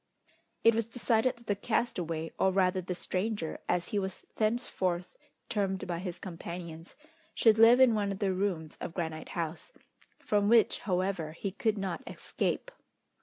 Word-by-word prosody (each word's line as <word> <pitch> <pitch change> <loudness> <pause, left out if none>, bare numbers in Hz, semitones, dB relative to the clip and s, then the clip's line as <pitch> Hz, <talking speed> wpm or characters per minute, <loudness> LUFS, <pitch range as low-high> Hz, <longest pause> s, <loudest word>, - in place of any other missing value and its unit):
It 230 - +7
was 225 0 0
decided 235 +1 +1
that 235 - -18
the 205 - +1
castaway, 175 -8 -1
or 190 - +4
rather 185 0 +2
the 180 0 -4
stranger, 185 -1 -2
as 175 -1 0
he 205 - 0
was 190 -2 -5
thenceforth 215 - -1 0.3
termed 195 -3 -1
by 175 -2 -3
his 180 -1 -5
companions, 170 -1 -7 0.4
should 220 -1 +5
live 230 +2 +8
in 260 -3 +7
one 205 -2 0
of 195 - -4
the 195 -2 +1
rooms 185 -5 -2
of 165 - -5
Granite 160 -3 -4
House, 165 - -4 0.5
from 205 -1 +1
which, 230 -1 +5
however, 180 -3 0
he 195 +4 -4
could 215 +2 0
not 195 +1 -3
escape. - - -2
190 Hz, 160 wpm, -31 LUFS, 175-220 Hz, 0.5 s, live